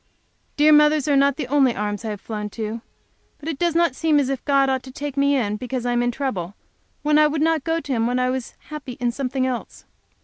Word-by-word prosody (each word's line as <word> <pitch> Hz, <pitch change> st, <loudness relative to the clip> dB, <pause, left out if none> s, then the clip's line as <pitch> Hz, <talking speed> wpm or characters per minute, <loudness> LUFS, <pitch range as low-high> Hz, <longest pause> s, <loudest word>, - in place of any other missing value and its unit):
Dear 305 Hz, +1 st, +6 dB
mother's 300 Hz, -1 st, +4 dB
are 290 Hz, -, +3 dB
not 275 Hz, 0 st, +4 dB
the 295 Hz, -, -2 dB
only 265 Hz, -2 st, +2 dB
arms 205 Hz, 0 st, -3 dB
I 225 Hz, -, -3 dB
have 205 Hz, -2 st, -5 dB
flown 210 Hz, -2 st, -5 dB
to. 220 Hz, +1 st, -4 dB, 0.6 s
But 295 Hz, -, -11 dB
it 305 Hz, -, -4 dB
does 345 Hz, -2 st, +1 dB
not 340 Hz, -5 st, +3 dB
seem 310 Hz, -1 st, +2 dB
as 270 Hz, -2 st, 0 dB
if 270 Hz, -2 st, -3 dB
God 275 Hz, -1 st, +3 dB
ought 265 Hz, -1 st, 0 dB
to 260 Hz, +1 st, -11 dB
take 285 Hz, +1 st, -5 dB
me 280 Hz, 0 st, +3 dB
in 210 Hz, -5 st, 0 dB
because 250 Hz, +1 st, -4 dB
I 245 Hz, -, +1 dB
am 240 Hz, 0 st, +1 dB
in 245 Hz, -, +1 dB
trouble, 215 Hz, -8 st, -3 dB, 0.5 s
when 300 Hz, 0 st, +4 dB
I 305 Hz, -, +6 dB
would 300 Hz, +1 st, -2 dB
not 320 Hz, -3 st, +1 dB
go 325 Hz, +2 st, 0 dB
to 285 Hz, -, -7 dB
him 230 Hz, -1 st, +1 dB
when 245 Hz, +1 st, 0 dB
I 255 Hz, 0 st, +1 dB
was 260 Hz, -2 st, -5 dB
happy 300 Hz, -4 st, -7 dB
in 245 Hz, -1 st, -1 dB
something 260 Hz, +1 st, -2 dB
else. 255 Hz, -2 st, -5 dB
265 Hz, 250 wpm, -22 LUFS, 240-295 Hz, 0.6 s, Dear